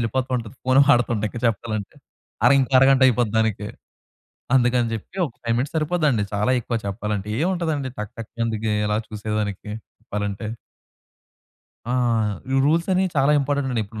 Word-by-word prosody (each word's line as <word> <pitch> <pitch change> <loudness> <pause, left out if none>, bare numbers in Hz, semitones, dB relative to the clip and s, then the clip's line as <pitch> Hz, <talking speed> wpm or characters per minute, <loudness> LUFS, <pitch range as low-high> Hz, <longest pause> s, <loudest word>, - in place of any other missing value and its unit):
వెళ్ళిపోతుంటది. 125 0 -2
Phone 130 +1 +4
వాడుతుంటే 120 -4 +3
ఇంకా 120 - -7
చెప్పాలంటే. 110 -2 -3 0.5
అర 120 - +7
ఇంకో 135 0 0
అరగంట 135 0 +5
అయిపోద్ది 120 -3 +2
దానికి. 105 -2 0 0.9
అందుకని 125 -2 +3
చెప్పి 115 - -8
ఒక 135 - -11
5 115 0 0
మినిట్స్ 140 +6 -2
సరిపోదండి. 155 -8 +1
చాలా 105 +4 +1
ఎక్కువ 115 0 -2
చెప్పాలంటే. 105 0 -3
ఏముంటదండి 160 -7 -1
టక్ 105 -1 -6
టక్ 115 -1 -8
అందుకే 110 -1 -1
ఎలా 105 0 +1
చూసేదానికి 105 -1 -3 0.3
చెప్పాలంటే. 105 +1 -4 1.4
ఆ! 125 - +1 0.6
ఈ - - +1
రూల్స్ 165 +3 +2
అనేవి 185 +1 +2
చాలా 140 +2 +4
ఇంపార్టెంట్ 140 0 -1
అండి. 115 -3 0
ఇప్పుడు 110 +2 -9
120 Hz, 145 wpm, -23 LUFS, 105-135 Hz, 1.4 s, అర